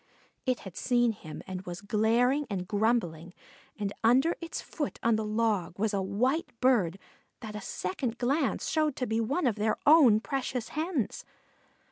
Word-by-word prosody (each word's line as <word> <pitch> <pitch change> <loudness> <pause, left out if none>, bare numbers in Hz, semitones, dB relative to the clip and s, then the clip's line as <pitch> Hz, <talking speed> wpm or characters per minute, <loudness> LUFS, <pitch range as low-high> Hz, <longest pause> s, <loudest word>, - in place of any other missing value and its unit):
It 255 -2 +1
had 190 -3 -10
seen 240 -2 +2
him 155 -8 -9
and 185 -1 -5
was 175 0 -5
glaring 235 +7 +2
and 185 -3 -3
grumbling; 195 -6 0 0.4
and 205 -1 -3
under 260 +9 +4
its 335 - -5
foot 295 -4 -4
on 230 -1 +4
the 220 - -1
log 210 -5 0
was 215 +1 0
a 200 - +1
white 235 - -1
bird 215 -9 +3 0.4
that 215 -3 -7
a 210 - -5
second 225 +7 -3
glance 270 +4 0
showed 310 -3 +1
to 255 - -2
be 225 0 0
one 275 +9 0
of 230 -4 +1
their 215 +1 +1
own 285 -8 +7
precious 250 -2 -3
hens. 310 - -2
225 Hz, 165 wpm, -29 LUFS, 205-260 Hz, 0.4 s, own